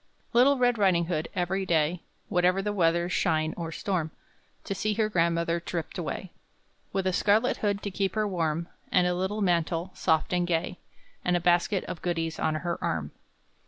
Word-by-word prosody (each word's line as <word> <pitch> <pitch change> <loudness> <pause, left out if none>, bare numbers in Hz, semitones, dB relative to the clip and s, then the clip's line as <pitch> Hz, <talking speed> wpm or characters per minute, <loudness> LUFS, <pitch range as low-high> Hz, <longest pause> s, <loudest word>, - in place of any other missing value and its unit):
Little 265 +4 +5
Red 245 -2 +2
Riding 180 -4 +3
hood, 160 -2 -2
every 190 +1 0
day, 170 -1 +1 0.3
Whatever 180 0 +2
the 210 0 -1
weather, 170 -2 +2
shine 160 -3 +1
or 165 -2 -5
storm, 170 -1 -2 0.5
To - - -3
see 210 +2 -1
her 215 0 +1
grandmother 170 -2 +1
tripped 170 -1 -5
away, 175 +2 -4 0.6
With 195 -1 -1
a 185 - +1
scarlet 215 +6 +3
hood 205 -1 -1
to 200 - -3
keep 195 +2 -1
her 215 -1 +1
warm, 170 -3 -1 0.2
And 180 -1 +4
a 180 - +2
little 190 +4 -2
mantle, 170 -1 0
soft 160 +2 +1
and 175 -1 +1
gay, 175 +1 -1 0.4
And 180 0 +2
a - - -1
basket 175 +3 +2
of 185 - -7
goodies 165 -2 -2
on 155 - +1
her 170 +2 -3
arm. 75 -2 -2
180 Hz, 180 wpm, -28 LUFS, 165-195 Hz, 0.6 s, Little